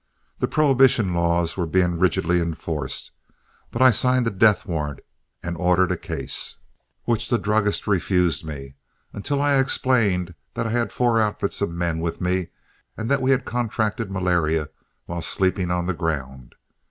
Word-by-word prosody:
The - - +1
prohibition 130 - +3
laws 85 0 +1
were 90 -3 -2
being 90 0 +1
rigidly 90 -1 +2
enforced, 80 -4 -4 0.6
but 115 - +1
I 130 - +8
signed 125 +2 +3
a 115 - 0
"death 100 0 +3
warrant" 75 -5 -3 0.4
and 85 0 -3
ordered 90 +1 +2
a - - +1
case, - - -3 0.5
which 115 -2 -1
the 120 - +3
druggist 105 -1 0
refused 90 -5 +1
me 70 -3 -8 0.4
until 140 +8 -2
I 140 -1 +3
explained 110 -9 +1 0.2
that - - -2
I 110 - -2
had 120 0 0
four 120 -2 +2
outfits 105 -1 -1
of - - +1
men 85 -1 -2
with 85 0 -3
me 90 0 0 0.5
and 110 +3 -3
that 140 -1 +2
we 130 - +1
had 135 -1 +2
contracted 115 -2 -2
malaria 85 -5 0 0.4
while 85 0 -5
sleeping 95 +1 0
on 90 0 0
the 95 - -1
ground. 65 -7 -4
90 Hz, 160 wpm, -23 LUFS, 85-115 Hz, 0.6 s, I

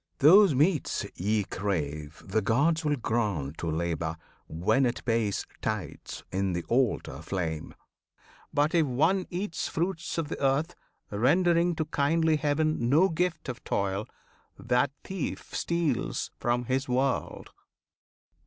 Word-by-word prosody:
Those 170 +3 +7
meats 150 +2 +1
ye 105 +3 0
crave 75 -7 -3
The 110 +3 0
gods 145 - +2
will 150 -1 +2
grant 105 - -2
to 85 - -2
Labour, 80 0 -2 0.3
when 95 +11 +2
it 120 - -4
pays 115 -4 0 0.2
Tithes 105 -8 -4
in 95 0 0
the 85 0 -2
altar 120 - 0
flame. 80 -3 -4 0.8
But 150 +4 +2
if 165 -3 +3
one 160 +9 +2
eats 180 -1 -3
Fruits 170 0 -2
of 165 -3 -1
the 150 - -5
earth, 145 +6 +2 0.4
rendering 170 - +3
to 155 - -1
kindly 155 +2 +2
Heaven 150 -4 +1
No 165 +8 +5
gift 170 0 -1
of 130 -1 -6
toil, 100 +1 -1 0.5
that 125 +1 +1
thief 190 -1 -5
steals 170 -7 -1
from 120 0 0
his 130 +2 -1
world." 130 +1 -1
130 Hz, 130 wpm, -28 LUFS, 100-160 Hz, 0.8 s, Those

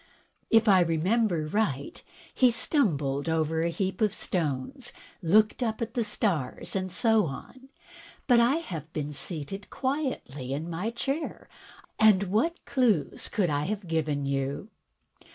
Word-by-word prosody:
If 225 -1 +4
I 195 -3 +7
remember 175 +1 +1
right, 155 -6 -2 0.3
he 255 - +5
stumbled 160 - +1
over 160 0 +1
a 170 - +1
heap 190 +3 -2
of 210 -3 +2
stones, 170 - -2 0.3
looked 210 +8 +3
up 225 -3 -1
at 230 -1 -3
the 240 -3 +1
stars, 195 - -2
and 185 -1 -2
so 220 0 +3
on. 255 - -9 0.6
But 245 -3 +5
I 240 +4 +4
have 165 - -5
been 150 -1 -3
seated 155 +6 -5
quietly 260 - -3
in 155 +4 -3
my 180 +7 -2
chair, 275 +6 -4 0.5
and 215 -3 +6
what 225 - 0
clews 220 - +1
can 185 -7 +1
I 145 0 0
have 200 0 -3
given 155 -3 -1
you?" 140 +8 -2
190 Hz, 140 wpm, -28 LUFS, 155-230 Hz, 0.6 s, I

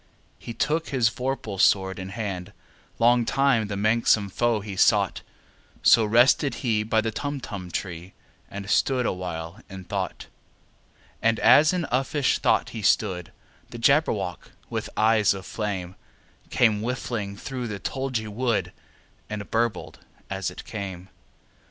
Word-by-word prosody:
He 115 - -8
took 160 +3 0
his 125 -5 +2
vorpal 125 -6 -4
sword 95 0 +3
in 95 0 -6
hand: 95 -4 -5 0.4
Long 120 +1 +4
time 130 -3 +2
the 100 -1 -4
manxome 110 -1 +2
foe 120 +1 +1
he 100 -1 -7
sought— - - +3 0.6
So 115 - +6
rested 120 +6 +4
he 110 -3 +2
by 110 +1 +1
the 110 0 -2
Tumtum 115 -9 -5
tree, 90 +1 -5 0.4
And 100 -1 -7
stood 125 +4 +2
awhile 90 0 -4
in 95 -1 -8
thought. - - -4 1.0
And 115 0 +2
as 135 +7 +6
in 180 -3 -1
uffish 135 +2 +1
thought - - +2
he 110 - -6
stood, 95 -4 +1 0.4
The - - -8
Jabberwock, 115 - +1 0.2
with - - -3
eyes 110 -2 +4
of 95 -1 -8
flame, 95 -4 -4 0.5
Came 110 -4 +3
whiffling 115 -4 -3
through 125 +2 -5
the 105 -2 -4
tulgey 130 -2 -3
wood, 115 +2 -1 0.6
And 105 -1 -6
burbled 115 -4 -1 0.3
as - - -2
it - - -10
came! 95 -3 -6
110 Hz, 140 wpm, -25 LUFS, 100-125 Hz, 1.0 s, So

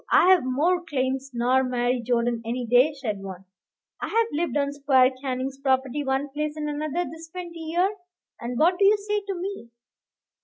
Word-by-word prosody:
"I've 365 -2 +6
more 305 +8 +1
claims 265 -3 -2
nor 250 +2 +2
Mary 250 -1 0
Jordan 235 -1 0
any 240 +2 -3
day," 245 +6 +4
said 215 -8 -4
one; 190 -1 -8 0.6
"I've 455 +1 +1
lived 325 0 -1
on 280 0 0
Squire 270 -2 +4
Canning's 265 0 -3
property, 265 +1 0
one 270 +1 -1
place 300 +2 -3
and 305 -1 -3
another, 305 +4 -2
this 325 0 -10
twenty 345 -1 -8
year." 350 +5 0 0.4
"And 240 +1 -4
what 350 +5 +3
do 400 - +5
you 415 +2 +6
say 415 +1 -1
to 390 - -2
me?" 370 -8 -6
280 Hz, 175 wpm, -25 LUFS, 255-335 Hz, 0.6 s, I've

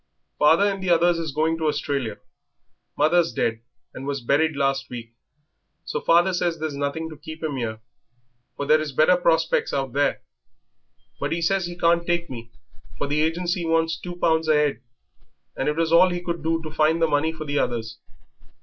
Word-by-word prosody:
"Father 160 +6 +5
and 200 -1 0
the 190 - -2
others 170 0 +3
is 160 -3 -3
going 160 +3 0
to 160 - 0
Australia. 140 -6 -2 0.8
Mother's 170 +2 +3
dead 115 -1 -1 0.3
and 135 - -7
was 140 -1 -2
buried 145 +5 +1
last 135 -1 0
week, 115 -2 -8 0.7
so 150 - -3
father 175 +3 +4
says 175 -1 0
there's 155 -2 -4
nothing 145 +3 -3
to - - -8
keep 155 +1 -10
'im 145 -4 -2
'ere, 110 -2 -4 0.8
for 140 - -3
there 155 +2 +4
is 150 -3 -5
better 155 +6 +5
prospects 165 -2 +1
out 135 -3 -2
there. 145 +1 0 1.0
But - - -2
he 165 - 0
says 180 +2 +1
he 175 0 -8
can't 170 0 +3
take 170 -1 -1
me, 115 -2 -8 0.5
for - - -2
the 145 +2 0
agency 175 +3 -1
wants 165 0 +1
two 175 +1 -8
pounds 160 -2 +1
a 150 -1 +4
'ead, 120 -5 -10 0.7
and - - -1
it 150 - -1
was 165 0 0
all 175 +2 +6
he 175 0 -4
could 170 -1 -3
do 165 0 0
to 155 - -6
find 155 +1 +2
the 165 - +4
money 155 +1 +1
for 155 -1 -8
the 145 0 -1
others. 115 -1 -3
160 Hz, 195 wpm, -23 LUFS, 145-170 Hz, 1.0 s, all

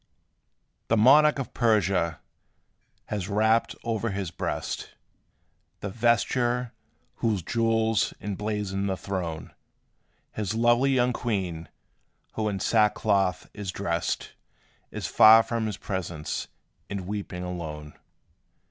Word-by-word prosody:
The 115 - +2
monarch 145 +7 +6
of 135 - -5
Persia 100 -8 +1 0.8
has 100 -2 -4
wrapped 110 +2 +2
o'er 115 0 -1
his 95 -4 -3
breast - - -4 0.9
The 100 - -3
vesture, 120 +2 +1 0.5
whose 105 -6 0
jewels 115 +1 +1
emblazoned 105 -1 -3
the 95 - -1
throne: 90 -6 -5 0.8
His 105 0 -3
lovely 120 +3 +3
young 125 -2 +2
queen, 95 -9 -3 0.6
who 110 -1 -1
in 100 -2 -3
sackcloth 105 -3 +2
is 100 -3 -5
dressed, 85 -4 -2 0.6
Is - - -6
far 110 +1 +7
from 115 -1 -2
his 105 - -4
presence, 85 -5 -4 0.4
and 100 -1 -3
weeping 100 -2 -5
alone. 80 -4 -6
105 Hz, 105 wpm, -26 LUFS, 95-115 Hz, 0.9 s, far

